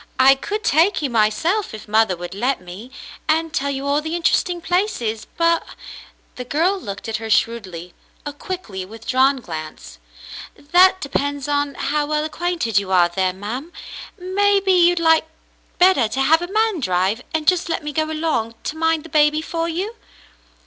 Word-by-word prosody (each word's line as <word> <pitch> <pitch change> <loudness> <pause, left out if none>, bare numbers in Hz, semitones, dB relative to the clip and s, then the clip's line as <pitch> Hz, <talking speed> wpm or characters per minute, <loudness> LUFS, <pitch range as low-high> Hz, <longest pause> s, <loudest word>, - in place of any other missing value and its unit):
I 265 +1 +7
could 415 +10 -4
take 325 +3 +2
you 275 - -1
myself 235 - +1
if 215 - -11
mother 215 -3 +2
would 175 +1 -7
let 250 +7 -1
me, 185 +7 -10 0.4
and 320 +1 +1
tell 280 +1 -1
you 275 0 -3
all 285 +1 +1
the 320 +2 -4
interesting 345 +1 +1
places, 335 - -1
but 335 0 +2 0.3
" - - -14
— - - -37
the 250 - -4
girl 335 +10 0
looked 200 - -7
at 225 - -2
her 225 0 -7
shrewdly, 185 -7 -1 0.3
a 290 - -5
quickly 290 - -6
with 220 +4 -12
drawn 265 +1 +2
glance 155 -5 -8 0.2
— - - -11
" - - -29
that 360 +5 +4
depends 285 0 -2
on 285 -1 -1
how 295 +1 -1
well 305 0 0
acquainted 315 - -1
you 195 -1 -6
are 175 -2 +4
there, 185 +1 0
ma'm. 225 - -6 0.5
Maybe 395 +1 +1
you'd 350 -1 +4
like 320 -1 +3 0.5
better 355 -10 +4
to 265 +5 -2
have 320 +4 +4
a 350 +2 -5
man 435 -3 +1
drive, 190 0 0
and 315 -2 -2
just 360 -1 +2
let 330 - -2
me 295 0 -5
go 315 +2 +1
along 310 -8 -2
to 305 - -4
mind 325 -1 0
the 330 - -12
baby 305 0 +3
for 330 0 -3
you." 375 +7 -3
290 Hz, 185 wpm, -20 LUFS, 225-335 Hz, 0.5 s, I